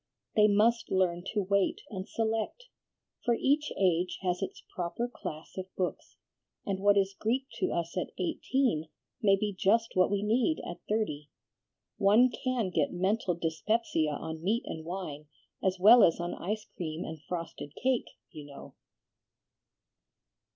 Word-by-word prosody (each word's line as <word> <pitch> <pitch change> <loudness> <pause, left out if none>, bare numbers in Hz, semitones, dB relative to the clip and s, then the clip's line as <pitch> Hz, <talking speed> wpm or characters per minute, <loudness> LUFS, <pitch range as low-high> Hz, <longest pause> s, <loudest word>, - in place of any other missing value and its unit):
They 210 -1 +6
must 220 +3 +3
learn 180 -2 +1
to 210 -2 0
wait 200 +1 +1
and 190 -2 -5
select; 225 - -1 0.6
for 240 - +3
each 290 +5 +1
age 180 -1 +2
has 180 0 0
its 195 - -5
proper 180 +7 -2
class 155 -9 -8
of 185 - -5
books, 180 -1 -3 0.5
and 195 -2 -1
what 200 +1 +4
is 195 0 +2
Greek 240 +7 -1
to - - +1
us 170 0 -2
at 180 - -2
eighteen 185 - 0 0.3
may 200 -3 +5
be 205 +1 -2
just 225 +5 +2
what 185 0 +4
we 205 0 0
need 240 +9 +2
at 175 0 -6
thirty. 150 -10 -1 0.7
One 220 +6 +5
can 245 -6 -1
get 155 -5 +1
mental 190 0 0
dyspepsia 165 +1 0
on 160 +2 -5
meat 215 +7 +1
and 160 - -6
wine 165 -5 -5 0.4
as 190 0 +1
well 225 +5 +9
as 165 - +4
on 175 0 -2
ice 210 +4 -3
cream 160 -1 -4
and 160 -1 -7
frosted 165 -2 -6
cake, 255 -1 0 0.2
you 150 -2 -9
know." 140 -1 -11
195 Hz, 150 wpm, -30 LUFS, 170-220 Hz, 0.7 s, well